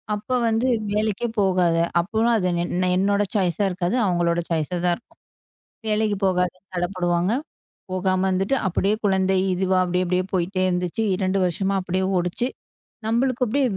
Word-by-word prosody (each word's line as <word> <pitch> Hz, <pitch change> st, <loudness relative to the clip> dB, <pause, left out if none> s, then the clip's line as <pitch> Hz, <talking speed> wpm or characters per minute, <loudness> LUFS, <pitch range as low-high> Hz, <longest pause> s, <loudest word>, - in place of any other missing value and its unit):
அப்ப 250 Hz, +5 st, -2 dB
வந்து 225 Hz, +3 st, +1 dB, 0.3 s
வேலைக்கே 215 Hz, +2 st, 0 dB
போகாத. 180 Hz, -4 st, +2 dB, 0.2 s
அப்போ 205 Hz, +5 st, -3 dB, 0.2 s
அது 185 Hz, -3 st, 0 dB, 0.2 s
என் 175 Hz, -, -4 dB, 0.2 s
என்னோட 200 Hz, +2 st, +2 dB
சாய்ஸா 190 Hz, +1 st, +1 dB
இருக்காது. 180 Hz, +3 st, -1 dB
அவங்களோட 175 Hz, -2 st, +1 dB
சாய்ஸாதான் 175 Hz, +2 st, 0 dB
இருக்கும். 235 Hz, -, -27 dB, 0.7 s
வேலைக்குப் 210 Hz, -2 st, 0 dB
போகாத 180 Hz, -1 st, +1 dB, 0.2 s
தள்ளப்படுவாங்க. 175 Hz, +1 st, 0 dB, 0.6 s
போகாம 185 Hz, 0 st, 0 dB
வந்துட்டு 195 Hz, +7 st, +1 dB
அப்படியே 195 Hz, +3 st, +1 dB
குழந்தை 190 Hz, -1 st, +2 dB, 0.2 s
இதுவா 185 Hz, 0 st, +1 dB
அப்படியே 180 Hz, +1 st, 0 dB
அப்படியே 180 Hz, +1 st, +1 dB
போயிட்டே 185 Hz, +1 st, 0 dB
இருந்துச்சு. 180 Hz, +3 st, -1 dB
2 190 Hz, 0 st, 0 dB
வருஷமா 195 Hz, +3 st, -1 dB
அப்படியே 185 Hz, +1 st, -1 dB
ஓடுச்சு. 180 Hz, +8 st, -1 dB, 0.6 s
நம்மளுக்கு 250 Hz, +2 st, +1 dB
அப்படியே 275 Hz, +5 st, +1 dB
185 Hz, 135 wpm, -23 LUFS, 180-205 Hz, 0.7 s, போகாத